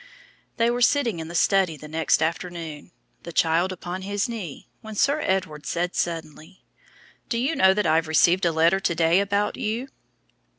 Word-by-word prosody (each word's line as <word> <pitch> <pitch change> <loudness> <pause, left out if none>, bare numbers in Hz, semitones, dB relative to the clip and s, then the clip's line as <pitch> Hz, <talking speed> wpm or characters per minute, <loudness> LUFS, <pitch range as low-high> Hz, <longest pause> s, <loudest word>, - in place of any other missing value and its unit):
"_ - - -43
They 230 +1 +3
were 245 +1 -2
sitting 240 - +2
in 160 - -6
the 170 - -8
study 185 -3 +2
the 150 - -11
next 160 0 +1
afternoon, 165 -1 -5 0.3
the 170 - -8
child 165 +3 +2
upon 180 0 -6
his 200 +1 -2
knee, 210 - -7
when 220 -1 -9
Sir 285 +8 +2
Edward 160 -6 -2
said 175 +1 -1
suddenly, 165 +1 -4 0.7
"Do 235 - -1
you 270 +7 0
know 190 0 +5
that 210 - 0
I 160 - +3
have 165 0 0
received 170 +4 +3
a - - +2
letter 165 +4 +3
to 170 -3 -1
day 165 +2 +3
about 200 +1 0
you?" 235 +5 -3
180 Hz, 185 wpm, -24 LUFS, 165-205 Hz, 0.7 s, know